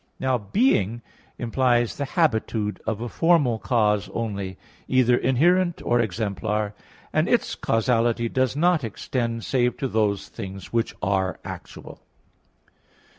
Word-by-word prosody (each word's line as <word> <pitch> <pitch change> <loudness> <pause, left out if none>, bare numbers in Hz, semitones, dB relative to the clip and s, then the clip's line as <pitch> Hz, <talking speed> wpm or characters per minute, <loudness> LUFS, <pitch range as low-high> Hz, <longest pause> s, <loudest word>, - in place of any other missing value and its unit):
Now 130 -2 +1
being 115 - +1 0.3
implies 120 0 +1
the 140 - -2
habitude 110 - 0
of 110 -1 -1
a 120 - -3
formal 145 -6 +2
cause 105 -6 +1
only, 100 -5 -3 0.3
either 125 -2 +4
inherent 170 +9 +2
or 120 - +2
exemplar; 105 0 -1 0.4
and - - +2
its - - +2
causality 115 0 +1
does 130 +2 0
not 170 -1 +3
extend 115 +1 -3
save 125 -2 +1
to 135 - -1
those 105 -4 0
things 95 -3 -8
which 115 -1 0
are 95 -1 0
actual. - - -9
115 Hz, 125 wpm, -24 LUFS, 105-130 Hz, 0.4 s, either